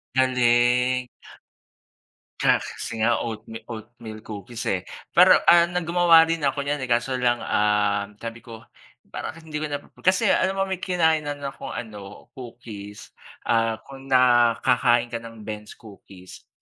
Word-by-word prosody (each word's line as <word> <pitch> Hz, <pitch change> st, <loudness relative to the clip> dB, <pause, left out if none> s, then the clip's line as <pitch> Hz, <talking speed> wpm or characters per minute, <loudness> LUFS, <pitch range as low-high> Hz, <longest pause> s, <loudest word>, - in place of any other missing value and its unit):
Galing. 125 Hz, 0 st, +2 dB, 1.3 s
Ka -, -, +4 dB
kasi 110 Hz, -1 st, -5 dB
nga 120 Hz, +1 st, +2 dB
oatme 110 Hz, 0 st, -6 dB
oatmeal 110 Hz, -1 st, -10 dB
cookies, 110 Hz, +3 st, -8 dB
eh. 90 Hz, -2 st, -3 dB, 0.2 s
Pero, -, -, +7 dB
ah, 170 Hz, 0 st, +6 dB
na 180 Hz, 0 st, -3 dB
gumawa 170 Hz, -1 st, +5 dB
rin 165 Hz, 0 st, -1 dB
ako 140 Hz, -1 st, -1 dB
niyan, 145 Hz, +1 st, -2 dB
eh, 130 Hz, -, -4 dB
kaso 120 Hz, +2 st, 0 dB
lang, 120 Hz, -1 st, +1 dB
um, 105 Hz, -1 st, 0 dB
sabi 115 Hz, +2 st, -8 dB
ko, 115 Hz, 0 st, -12 dB, 0.5 s
parang -, -, -6 dB
hindi 155 Hz, -2 st, -6 dB
ko 155 Hz, -, -3 dB
na 145 Hz, -, -3 dB
pap -, -, -22 dB
kasi 190 Hz, +3 st, +3 dB
alam 190 Hz, +1 st, +2 dB
mo 195 Hz, -, +1 dB
may 190 Hz, -2 st, -4 dB
kinainan 160 Hz, -6 st, 0 dB
akong 135 Hz, -, -6 dB
ano, 105 Hz, -4 st, -9 dB
cookies, 110 Hz, -5 st, -10 dB, 0.3 s
ah, 115 Hz, -1 st, +1 dB
kung 135 Hz, 0 st, -12 dB
nakakain 120 Hz, -1 st, +3 dB
ka 115 Hz, -, -3 dB
ng 115 Hz, -2 st, -11 dB
Ben's 105 Hz, 0 st, -8 dB
Cookies. 95 Hz, -4 st, -15 dB
120 Hz, 150 wpm, -24 LUFS, 110-145 Hz, 1.3 s, Pero